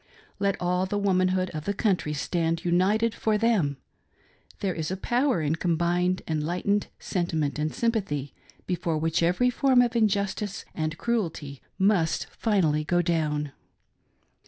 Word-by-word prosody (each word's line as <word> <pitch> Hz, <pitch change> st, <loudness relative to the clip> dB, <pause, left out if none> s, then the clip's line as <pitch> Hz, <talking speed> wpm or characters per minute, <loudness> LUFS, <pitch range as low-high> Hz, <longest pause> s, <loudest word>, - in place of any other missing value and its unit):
Let 200 Hz, -1 st, 0 dB
all 180 Hz, +1 st, 0 dB
the 205 Hz, -, -2 dB
womanhood 185 Hz, -2 st, +1 dB
of 155 Hz, -2 st, -6 dB
the 200 Hz, -, -1 dB
country 190 Hz, -8 st, 0 dB
stand 165 Hz, +3 st, -1 dB
united 200 Hz, +6 st, +2 dB
for 215 Hz, 0 st, 0 dB
them. 205 Hz, -, +1 dB, 0.8 s
There 195 Hz, -2 st, -1 dB
is 160 Hz, -2 st, -3 dB
a 190 Hz, -, -3 dB
power 245 Hz, -, +1 dB
in 155 Hz, +2 st, 0 dB
com 170 Hz, -1 st, 0 dB
bined 180 Hz, +2 st, +1 dB
enlightened 175 Hz, +6 st, 0 dB
sentiment 160 Hz, -5 st, -2 dB
and 155 Hz, +1 st, 0 dB
sympathy 195 Hz, -, -1 dB, 0.3 s
before 175 Hz, -3 st, -1 dB
which 160 Hz, +1 st, 0 dB
every 180 Hz, +9 st, +3 dB
form 260 Hz, 0 st, +3 dB
of 245 Hz, -1 st, +3 dB
injustice 205 Hz, -1 st, 0 dB
and 155 Hz, 0 st, -3 dB
cruelty 165 Hz, -, -2 dB, 0.2 s
must 190 Hz, -5 st, +2 dB
finally 165 Hz, -9 st, +1 dB
go 175 Hz, +3 st, +1 dB
down. 150 Hz, -4 st, 0 dB
180 Hz, 140 wpm, -26 LUFS, 160-205 Hz, 0.8 s, every